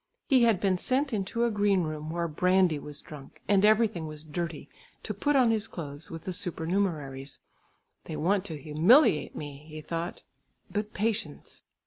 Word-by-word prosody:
He 260 -2 +5
had 225 -5 +3
been 190 -2 +1
sent 270 +4 0
into 210 +3 -1
a 235 - +1
green 205 -3 +2
room 155 -1 -4
where 170 +1 -1
brandy 180 0 +2
was 145 0 -7
drunk 145 -3 -12
and 200 -1 +4
everything 215 -6 +3
was 155 0 -8
dirty, 160 0 -5 0.4
to - - -3
put 290 0 0
on 250 -4 +5
his 220 -1 0
clothes 145 -2 -7
with 165 -1 -8
the 185 - -4
supernumeraries. 160 -6 -2 0.7
"They 160 - -5
want 185 +6 +1
to 160 -6 -6
humiliate 155 - +4
me," 145 -1 -7
he 155 0 -7
thought, 165 +3 -5 0.5
"but 210 +1 -3
patience!" 210 -8 -3
175 Hz, 165 wpm, -28 LUFS, 155-205 Hz, 0.7 s, He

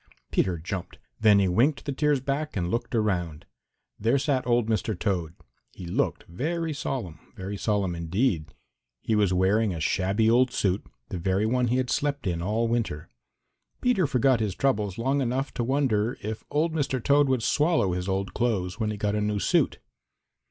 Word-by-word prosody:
Peter 90 -3 +1
jumped. 90 +3 -6 0.2
Then 105 -2 +6
he 100 -1 +3
winked 120 - +2
the 145 - -2
tears 145 0 +2
back 140 +1 -3
and 90 -1 -1
looked 120 +1 -2
around. 90 -8 -1 0.5
There 115 +6 +2
sat 135 -2 0
old 120 -2 +2
Mr. 110 -2 -1
Toad. 90 -5 -2 0.4
He 90 - -9
looked 85 - -1
very 160 - -3
solemn, 120 - -4 0.2
very 95 +2 -5
solemn 100 -2 0
indeed. 85 +1 -1 0.5
He 110 - 0
was 105 -3 +3
wearing 95 +2 +2
a - - -5
shabby 95 +7 +1
old 125 +3 +4
suit, 95 -3 0 0.3
the 95 -6 -4
very 95 +4 +1
one 125 +2 +1
he 125 +2 +1
had 130 -1 -1
slept 145 -4 -1
in 85 -3 -1
all 110 +6 0
winter. 110 -10 -2 0.7
Peter 220 -10 +2
forgot 130 -1 +3
his 105 -4 -1
troubles 105 -8 0
long 135 +4 +1
enough 130 +2 -1
to 120 - -2
wonder 125 -3 +1
if 110 +1 -4
old 160 +2 +1
Mr. 145 -4 0
Toad 145 0 +4
would 130 -4 +1
swallow 150 - +2
his 90 +1 -3
old 95 +1 -2
clothes 110 -4 -1
when 110 -2 0
he 105 - -3
got 105 0 -1
a 105 - 0
new 105 0 0
suit. 100 - +2
110 Hz, 180 wpm, -26 LUFS, 95-130 Hz, 0.7 s, Then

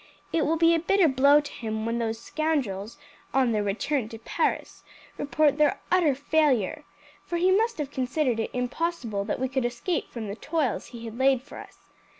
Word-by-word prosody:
It 320 -2 +2
will 325 +2 +1
be 330 +1 +5
a 330 - +3
bitter 375 +1 +3
blow 280 +2 +5
to 295 - -9
him 220 -1 -4
when 230 +1 -1
those 225 -1 -1
scoundrels, 235 -8 -2 0.4
on 260 -3 +3
their 215 -2 +1
return 215 +4 -1
to 225 - -8
Paris, 230 - -2 0.3
report 290 0 +1
their 300 -1 +3
utter 340 -7 +4
failure, 295 -2 +1 0.4
for 345 - -3
he 365 +2 +3
must 450 +4 +2
have 290 -2 -4
considered 255 -2 0
it 225 - -1
impossible 250 -4 -2
that 210 - -2
we 260 - 0
could 265 0 -1
escape 240 +8 -2
from 225 -3 -6
the 200 - -5
toils 295 -2 -2
he 235 -1 -9
had 225 +2 -8
laid 265 -1 +3
for 290 - -11
us. - - -15
270 Hz, 190 wpm, -26 LUFS, 230-310 Hz, 0.4 s, be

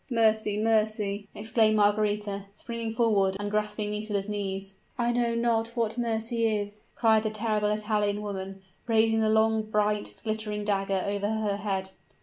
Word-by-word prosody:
"Mercy 220 -3 +2
mercy!" 215 -2 +1
exclaimed 220 0 +2
Margaretha, 205 -1 +1
springing 230 +1 -5
forward, 205 -4 +2
and 205 0 -3
grasping 210 0 -1
Nisida's 210 -1 -2
knees. 195 -2 -4 0.2
"I 240 -1 +1
know 240 -1 +1
not 230 0 0
what 225 -2 0
mercy 230 -1 0
is!" 210 -1 -3
cried 220 -2 +4
the 215 - -1
terrible 215 -1 0
Italian 210 -1 0
woman, 195 -1 -6 0.2
raising 225 -1 +3
the 220 - +2
long, 220 0 +3
bright, 210 -1 0
glittering 215 -1 -3
dagger 195 -2 0
over 205 0 -1
her 215 -2 -1
head. 190 -2 -2
215 Hz, 145 wpm, -28 LUFS, 205-225 Hz, 0.2 s, cried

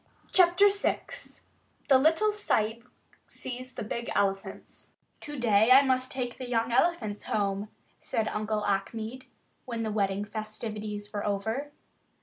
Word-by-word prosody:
CHAPTER 360 +2 +6
VI 400 0 0 0.9
THE 265 -2 +6
LITTLE 325 +9 +4
SAHIB 230 - -1 0.4
SEES 255 0 -7
THE - - -4
BIG 235 +3 -4
ELEPHANTS 195 -1 -2 0.3
"TO 295 0 -7
DAY 220 -2 +4
I 265 +2 +9
must 255 -1 +1
take 250 -2 -4
the 255 -1 -6
young 230 -1 +1
elephants 235 -7 +1
home," 200 0 -1 0.3
said 220 -1 -1
Uncle 210 0 -2
Achmed, 220 +5 -2 0.4
when 230 -2 -3
the 220 - -2
wedding 200 -1 0
festivities 215 -1 -5
were 205 - -2
over. 220 +8 -2
225 Hz, 130 wpm, -29 LUFS, 210-260 Hz, 0.9 s, I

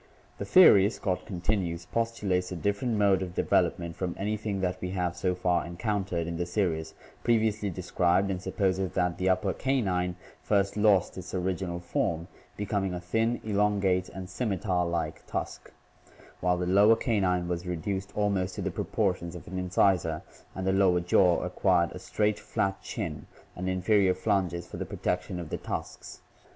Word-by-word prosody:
"The - - -3
theory," 105 - +7
Scott 95 -4 -3
continues, 90 -2 -2
"postulates 100 -5 -1
a - - -3
different 100 +6 -1
mode 100 -2 +3
of 90 -1 -5
development 85 -1 +1
from 90 -2 -3
anything 105 -1 -2
that 90 0 -2
we 90 - -3
have 90 -1 -1
so 90 0 0
far 90 -1 +1
encountered 90 -1 -2
in 85 0 -4
the 85 - -2
series 80 -6 -1 0.3
previously 110 -3 +2
described 90 +1 +1
and 90 -1 -3
supposes 95 -2 -1
that 90 -1 0
the 95 +1 +2
upper 95 +1 +1
canine 95 -10 0 0.3
first 100 -2 +1
lost 105 -3 +3
its 90 +1 -7
original 90 -1 -2
form, 85 -1 -1 0.3
becoming 100 -2 -1
a - - -3
thin, 115 +7 0
elongate 100 -3 +1
and 95 -1 -7
scimitar 95 -3 -1
like 85 -1 -3
tusk, - - -5 0.7
while 90 0 +1
the 90 - -1
lower 100 +5 +6
canine 95 -7 0
was 90 +1 -3
reduced 95 +3 -3
almost 100 -3 0
to - - -4
the - - -1
proportions 90 -5 -1
of 90 - -10
an 95 +1 -4
incisor 90 -3 +1 0.3
and 95 - -4
the 95 - +2
lower 95 -2 +4
jaw 90 0 +3
acquired 90 -1 +2
a - - -8
straight, 105 0 0
flat 95 0 -2
chin - - -5 0.3
and 90 +1 -3
inferior 95 0 +3
flanges 90 -3 0
for - - -9
the - - -2
protection 90 0 -3
of 85 -3 -6
the - - -2
tusks. - - -6
95 Hz, 165 wpm, -28 LUFS, 90-100 Hz, 0.7 s, theory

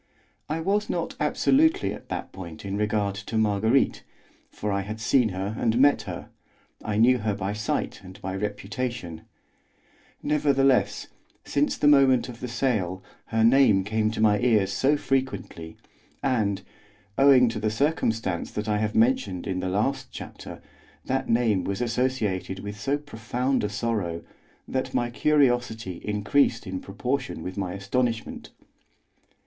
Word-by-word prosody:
I 160 +2 -1
was 205 +4 0
not - - -2
absolutely 320 +4 +2
at - - -11
that - - -4
point 85 -2 -9
in 100 0 -3
regard 105 -1 0
to 105 +3 -5
Marguerite, 110 +4 +2 0.5
for 105 - -4
I 100 0 0
had 105 +3 -6
seen 120 +1 +3
and 105 +4 -1
met 140 +2 +5
her, - - -7 0.5
I 105 -1 -2
knew 125 +3 +5
her 105 -1 -1
by 100 0 -3
sight 105 0 -2
and 95 +1 -12
by 95 0 -4
reputation; 105 -3 -4 1.0
nevertheless, 140 -3 +2 0.4
since 145 +1 0
the 145 - +2
moment 135 -4 +5
of 120 -1 -9
the 125 - -4
sale, 105 -7 -1 0.2
her 110 -1 +1
name 115 -5 +5
came 110 +2 0
to 110 - -5
my 105 -1 +4
ears 105 -5 +2
so 140 +8 +2
frequently, 130 - -3 0.5
and, 110 -7 0 0.5
owing 135 -1 +6
to 110 - -4
the 110 0 0
circumstance 115 - 0
that 105 0 -4
I 105 -1 +1
have 105 0 -1
mentioned 105 -6 +2
in 95 -1 -2
the 95 - -2
last 130 +7 0
chapter, - - -9 0.4
that 130 +1 -1
name 115 -5 +2
was 100 +1 -3
associated 115 -6 -1
with 105 0 -7
so 135 +7 0
profound 125 -1 -2
a 105 - 0
sorrow, 105 -6 -2 0.4
that 130 0 -3
my 120 0 0
curiosity 120 - +1
increased 110 +4 +1
in 95 -1 -4
proportion 125 0 -3
with 95 - -5
my 95 -3 -3
astonishment. 115 +4 -2
110 Hz, 145 wpm, -26 LUFS, 100-130 Hz, 1.0 s, owing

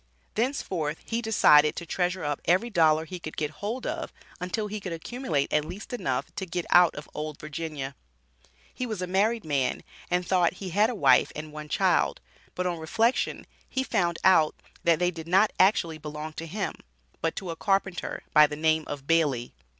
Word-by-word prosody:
Thenceforth 185 - -1
he 230 +1 -2
decided 150 -9 +5
to 170 - -5
treasure 180 +2 -1
up 145 -1 -2
every 190 +8 +2
dollar 160 -4 +4
he 180 +2 -7
could 155 -2 -8
get 150 -1 -1
hold 225 +5 -3
of - - -3 0.3
until 180 +4 -2
he 210 +1 -4
could 195 -3 -6
accumulate 165 - -2
at 150 - +3
least 185 - -8
enough 245 - -2
to 190 - -3
get 175 0 -3
out 175 -1 +6
of 150 - -8
"Old 150 -1 -5
Virginia." 150 -3 -5 0.8
He 250 - -3
was 215 -5 -3
a - - 0
married 205 +4 +1
man, 140 -4 0 0.3
and 180 0 +1
thought 180 -2 +2
he 185 0 -7
had 210 +5 +3
a 245 - -3
wife - - +4
and 150 0 -7
one 150 0 -8
child, - - +2 0.4
but 180 - -2
on 175 -2 -1
reflection, 225 +10 0 0.2
he 265 - -1
found 175 -9 0
out 160 -5 +5 0.3
that 170 -1 +4
they 180 +1 +1
did 165 -2 -9
not 195 +5 +4
actually 170 -5 +3
belong 150 +1 -6
to 165 +1 -6
him, 200 +5 -3 0.5
but 165 - -1
to 185 -3 -4
a - - -5
carpenter, 195 0 -1
by 150 0 +8
the 150 - -5
name 155 +1 +2
of 140 -1 -6
Bailey. 145 -7 +1
170 Hz, 190 wpm, -27 LUFS, 155-195 Hz, 0.8 s, by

